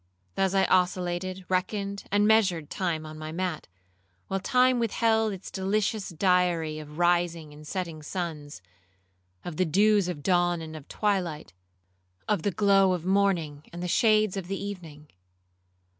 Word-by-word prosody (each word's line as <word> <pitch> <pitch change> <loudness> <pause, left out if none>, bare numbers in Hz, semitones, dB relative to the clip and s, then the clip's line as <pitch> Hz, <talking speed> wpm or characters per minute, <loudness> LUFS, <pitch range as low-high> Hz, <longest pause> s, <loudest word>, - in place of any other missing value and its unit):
Thus 195 0 0
I 195 - +4
oscillated, 185 0 0
reckoned, 200 +2 -2
and 205 +1 +3
measured 190 -9 +2
time 165 -4 -2
on 155 0 -9
my 155 0 -6
mat, 180 -1 -3 0.6
while 195 - -1
time 250 +4 +3
withheld 225 -1 +1
its 195 -1 -8
delicious 200 +2 -1
diary 175 -3 +1
of 150 0 -10
rising 175 -3 +1
and 150 +1 -13
setting 170 -4 -4
suns,—of 95 - -9
the 185 - +2
dews 205 +3 +3
of 160 -5 -5
dawn 175 -2 +2
and 160 -1 -8
of 155 -3 -10
twilight,—of 95 - -4
the 205 - 0
glow 195 0 +3
of 175 -2 -4
morning 180 -7 +1
and 175 +1 -7
the - - -2
shades 215 +1 +3
of 190 -3 -5
the 195 0 -3
evening. 165 -7 -8
180 Hz, 145 wpm, -27 LUFS, 155-195 Hz, 0.6 s, I